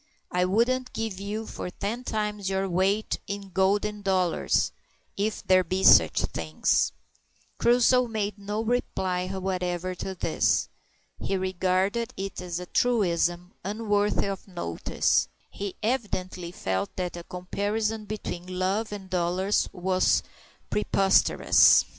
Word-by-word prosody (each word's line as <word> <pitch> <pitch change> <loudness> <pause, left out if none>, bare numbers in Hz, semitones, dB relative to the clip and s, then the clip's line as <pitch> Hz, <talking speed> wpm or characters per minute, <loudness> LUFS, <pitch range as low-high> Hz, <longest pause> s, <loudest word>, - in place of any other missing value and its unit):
"I 180 0 +2
wouldn't 250 +6 +1
give 220 -4 -3
you 210 +3 -4
for 180 - -6
ten 210 +7 -4
times 210 -4 -2
your 195 0 0
weight 190 +4 +1
in 200 -1 -5
golden 205 +3 +1
dollars 185 -3 +1 0.4
if 210 +2 -2
there 185 0 +5
be 185 +2 -2
sich - - +7
things." 80 -1 +1 0.7
Crusoe 245 +1 +4
made 210 -2 -3
no 205 +2 -3
reply 190 -6 -1
whatever 185 -1 -2
to 190 +1 -5
this. - - +1 0.5
He 195 - -1
regarded 190 +4 0
it 195 -1 -4
as 175 -1 -4
a 180 - -6
truism 180 -6 +1
unworthy 205 0 0
of 195 0 -5
notice; 170 - 0 0.2
he 200 -2 -5
evidently 185 -7 -2
felt 95 - -2
that 180 -2 -3
a 170 - -7
comparison 210 +5 -2
between 185 -3 -5
love 195 +4 0
and 200 -2 -7
dollars 185 +2 +1
was 185 0 +2 0.5
preposterous. 195 -2 +5
195 Hz, 125 wpm, -27 LUFS, 180-210 Hz, 0.7 s, sich